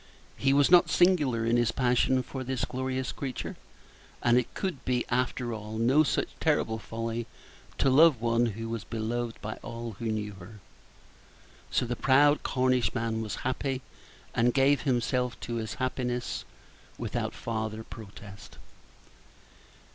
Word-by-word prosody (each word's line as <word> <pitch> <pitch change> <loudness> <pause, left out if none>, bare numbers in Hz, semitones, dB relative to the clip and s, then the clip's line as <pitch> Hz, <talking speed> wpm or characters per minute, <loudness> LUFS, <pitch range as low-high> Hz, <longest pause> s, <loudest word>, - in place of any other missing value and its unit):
He 135 - +2
was 140 +3 +4
not 180 -1 +7
singular 150 -11 +3
in 115 +1 +3
his 120 -1 +2
passion 125 0 +2
for 130 +2 -6
this 130 0 -1
glorious 130 0 -3
creature, 130 -3 -5 0.7
and 120 0 +4
it 125 -1 +1
could 185 -8 -3
be, 125 -1 0
after 120 -1 0
all, 110 0 -6
no 125 +7 +4
such 155 - 0
terrible 110 0 +1
folly 115 +2 -4 0.5
to - - +2
love 145 0 +6
one 115 +1 +2
who 115 +1 -5
was 115 -2 -4
beloved 115 +1 -3
by 110 +1 -4
all 115 -3 -6
who 115 - -5
knew 105 -2 -2
her. 105 +4 -12 1.1
So - - +1
the 120 0 -2
proud 145 +4 +4
Cornishman 125 -3 0
was 110 -2 -3
happy, 130 0 -1 0.5
and 120 +1 +2
gave 140 +1 +4
himself 125 -1 0
up - - -17
to 120 0 -3
his 110 -1 -4
happiness 125 -1 -2 0.5
without - - -3
farther 110 -1 -3
protest. 100 -2 -11
120 Hz, 145 wpm, -29 LUFS, 115-130 Hz, 1.1 s, not